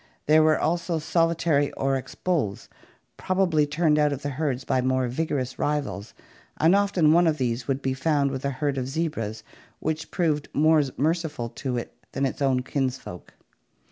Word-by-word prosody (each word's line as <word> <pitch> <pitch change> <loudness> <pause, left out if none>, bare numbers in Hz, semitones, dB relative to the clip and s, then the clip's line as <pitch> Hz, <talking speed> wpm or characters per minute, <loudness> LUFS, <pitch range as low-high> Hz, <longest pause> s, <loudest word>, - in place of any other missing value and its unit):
There 155 +1 +5
were 155 0 +4
also 170 +1 0
solitary 165 -2 +1
oryx 135 -1 -2
bulls, 155 - -2 0.5
probably 175 -6 +1
turned 150 0 +2
out 150 -1 +3
of 140 0 -4
the 145 - -2
herds 135 -2 -2
by 130 -2 +1
more 130 0 +1
vigorous 130 -1 -2
rivals, 145 -8 -2 0.4
and 165 +4 +4
often 195 -6 +3
one 175 +1 +5
of 155 -1 +1
these 120 -2 -2
would 135 0 -1
be 130 - 0
found 140 0 +1
with 130 -1 -5
a 140 - 0
herd 140 0 -2
of 125 - -3
zebras 125 -9 -3 0.4
which 160 0 -3
proved 155 -5 0
more 155 +1 +5 0.2
merciful 155 -5 -1
to 125 +1 -4
it 120 - -5 0.2
than 135 - 0
its 135 - -3
own 130 -2 +2
kinsfolk. 130 -9 -4
145 Hz, 170 wpm, -25 LUFS, 130-160 Hz, 0.5 s, There